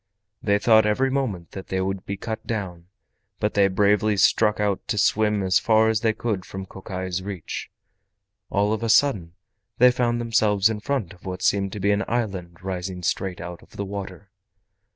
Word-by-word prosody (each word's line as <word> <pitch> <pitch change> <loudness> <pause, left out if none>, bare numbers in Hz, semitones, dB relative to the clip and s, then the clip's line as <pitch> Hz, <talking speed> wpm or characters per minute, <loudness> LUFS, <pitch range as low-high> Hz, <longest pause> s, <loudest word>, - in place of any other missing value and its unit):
They 100 -1 +2
thought 110 0 +5
every 130 +6 +1
moment 110 -11 -2
that 95 - -8
they 95 - -1
would 95 0 -3
be 100 - -3
cut 110 +1 -6
down, 90 -6 -4 0.5
but 105 0 0
they 100 -1 +4
bravely 105 +2 +2
struck 105 +2 +3
out 100 -2 -1
to 105 - -1
swim 105 0 +2
as 95 0 +3
far 110 0 +4
as 110 -1 +1
they 115 - +3
could 110 -4 -3
from 95 +1 -7
Kokai's 95 -1 -5
reach. 95 -4 -6 0.8
All 105 +2 +1
of 110 - -3
a 115 - -1
sudden 110 - +3 0.4
they 125 +1 +7
found 120 -1 0
themselves 110 -3 +2
in 105 - -4
front 125 -6 -2
of 90 - -20
what 90 0 -5
seemed 100 -1 +2
to 105 - -5
be 100 +1 +2
an 100 0 +1
island 95 -7 -3
rising 90 -1 -4
straight 95 +1 -1
out 85 -1 -7
of - - -17
the 100 - -3
water. 100 0 -7
100 Hz, 190 wpm, -24 LUFS, 95-110 Hz, 0.8 s, they